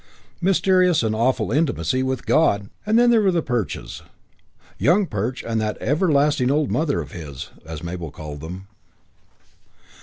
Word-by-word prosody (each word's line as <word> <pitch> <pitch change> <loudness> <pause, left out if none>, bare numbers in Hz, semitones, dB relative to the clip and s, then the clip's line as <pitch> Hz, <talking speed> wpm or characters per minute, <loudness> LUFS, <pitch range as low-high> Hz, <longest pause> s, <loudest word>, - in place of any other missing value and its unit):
Mysterious 185 -3 +3
and 110 -1 0
awful 115 -1 +1
intimacy 130 - +1
with 130 -1 -2
God! 150 -10 +3
IV 100 - -15 0.2
And 220 +2 +3
then 240 0 +5
there 230 -2 +5
were 195 -2 +3
the 170 -3 0
Perches 120 -6 -3 0.8
"Young 190 +6 +3
Perch 115 - -3
and 115 -1 -1
that 105 0 -2
everlasting 145 -4 +2
old 145 +1 +1
mother 150 - 0
of 70 -2 -9
his", 75 -6 -8 0.2
as 80 -1 -7
Mabel 85 -1 -5
called 75 -2 -8
them. 90 +5 -8
130 Hz, 155 wpm, -22 LUFS, -, 0.8 s, then